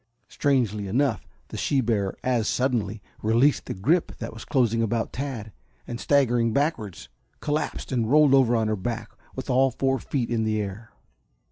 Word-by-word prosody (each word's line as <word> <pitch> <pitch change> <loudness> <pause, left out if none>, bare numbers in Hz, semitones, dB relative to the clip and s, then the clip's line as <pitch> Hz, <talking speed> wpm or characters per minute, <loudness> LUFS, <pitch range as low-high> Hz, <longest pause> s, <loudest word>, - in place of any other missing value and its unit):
Strangely 115 -8 0
enough 120 0 0 0.2
the - - -6
she 140 - +1
bear 105 -6 0
as 120 -4 +1
suddenly 110 -6 -1 0.2
released 120 +7 +3
the - - -4
grip 155 - +1
that 115 - -6
was 110 - -9
closing 115 -4 +2
about 115 0 -1
Tad, 125 -6 -5 0.3
and 120 -1 -6
staggering 120 -5 +2
backwards, 140 - -1 0.3
collapsed 150 -1 -2
and 115 -4 0
rolled 150 0 +5
over 130 -3 +5
on 110 -1 +1
her 110 - +1
back 110 +2 -4 0.2
with 130 - -5
all 135 0 +4
four 135 +1 0
feet 125 -5 -2
in 115 -1 +1
the 110 0 0
air. 105 +2 -6
120 Hz, 165 wpm, -25 LUFS, 110-135 Hz, 0.3 s, rolled